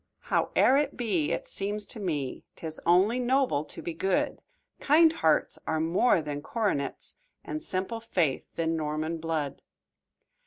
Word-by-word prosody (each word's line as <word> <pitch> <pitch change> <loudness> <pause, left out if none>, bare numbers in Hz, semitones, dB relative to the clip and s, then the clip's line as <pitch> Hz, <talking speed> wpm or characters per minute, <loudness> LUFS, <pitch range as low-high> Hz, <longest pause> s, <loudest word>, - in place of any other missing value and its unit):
"Howe'er 265 - +4
it 290 -1 0
be, 195 -11 0
it - - -2
seems 205 +1 0
to 225 - -7
me 150 -9 -3
'Tis 160 -1 -6
only 190 +8 +4
noble 250 - +2
to - - -10
be 170 - -3
good; 185 +3 0 0.4
Kind 320 +2 +5
hearts 160 - +1
are 160 0 0
more 165 +3 +3
than 145 -1 -4
coronets, 195 - -2 0.2
And 310 - -5
simple 190 +5 -3
faith 175 - -1
than 165 0 0
Norman 155 +1 -2
blood." 155 -4 -3
175 Hz, 145 wpm, -28 LUFS, 155-230 Hz, 0.4 s, Kind